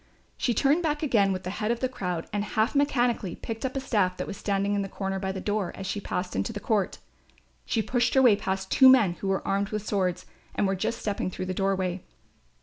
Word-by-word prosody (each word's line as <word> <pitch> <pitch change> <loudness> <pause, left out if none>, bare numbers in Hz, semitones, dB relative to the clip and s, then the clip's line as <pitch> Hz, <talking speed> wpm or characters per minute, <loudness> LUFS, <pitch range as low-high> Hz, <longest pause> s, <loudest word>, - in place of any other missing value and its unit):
She 240 - 0
turned 285 +8 +3
back 300 -2 -1
again 210 -9 +3
with 185 -1 -3
the 185 - -4
head 210 - 0
of 235 0 0
the 255 - +1
crowd 180 -9 -3
and 205 0 0
half 220 +2 0
mechanically 245 - +1
picked 225 -1 -6
up 260 - -9
a - - 0
staff 205 -9 0
that - - -3
was 200 - -6
standing 200 0 0
in 200 - +1
the 195 - -4
corner 195 0 -3
by 190 0 -2
the 190 - -5
door, 205 -2 -1
as 190 - -7
she 200 +1 -3
passed 180 -1 -3
into - - -1
the 210 - -5
court. 205 -2 0 0.7
She 225 - +1
pushed 245 +1 +1
her 265 - +6
way 235 -5 +7
past 190 -1 -3
two 265 -1 +8
men 230 -9 +6
who 195 - -2
were 195 0 -1
armed 200 +1 0
with 215 -1 -4
swords 185 -4 -1 0.3
and - - +1
were 195 - +1
just 210 +5 -2
stepping 205 -5 -2
through 185 - -5
the 185 - -2
doorway. 190 -1 -1
205 Hz, 240 wpm, -27 LUFS, 190-235 Hz, 0.7 s, two